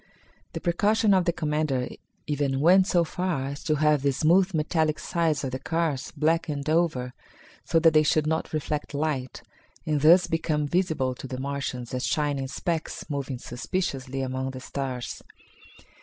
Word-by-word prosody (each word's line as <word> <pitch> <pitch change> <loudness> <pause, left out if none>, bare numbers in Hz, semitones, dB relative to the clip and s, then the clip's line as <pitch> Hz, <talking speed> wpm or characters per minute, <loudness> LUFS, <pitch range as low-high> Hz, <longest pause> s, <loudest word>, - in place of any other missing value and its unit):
The - - -3
precaution 205 +4 +2
of 185 -2 +3
the 170 - +3
commander 150 -5 -1 0.4
even 145 -2 -1
went 185 +5 +5
so 175 -3 +3
far 170 -4 -2
as 140 +1 -7
to 155 - +2
have 150 -1 +3
the 140 0 +2
smooth 175 +7 +3
metallic 155 -1 0
sides 155 -2 0
of 130 - -2
the 130 - -4
cars 160 -2 -1
blackened 155 -2 0
over 155 -7 +1 0.5
so 165 - +1
that 165 -1 +5
they 155 - +6
should 155 0 +2
not 160 +1 -1
reflect 150 -1 -3
light, 140 -4 -2 0.4
and 150 -2 0
thus 175 +5 +7
become 160 -3 -1
visible 160 -6 0
to 130 - -9
the 130 0 -5
Martians 135 -3 -4
as 125 0 -1
shining 145 -3 0
specks, 165 +4 -3
moving 140 -2 -3
suspiciously 135 +1 -3
among 130 0 -2
the 130 -1 -7
stars. 130 -2 -5
150 Hz, 160 wpm, -26 LUFS, 135-165 Hz, 0.5 s, thus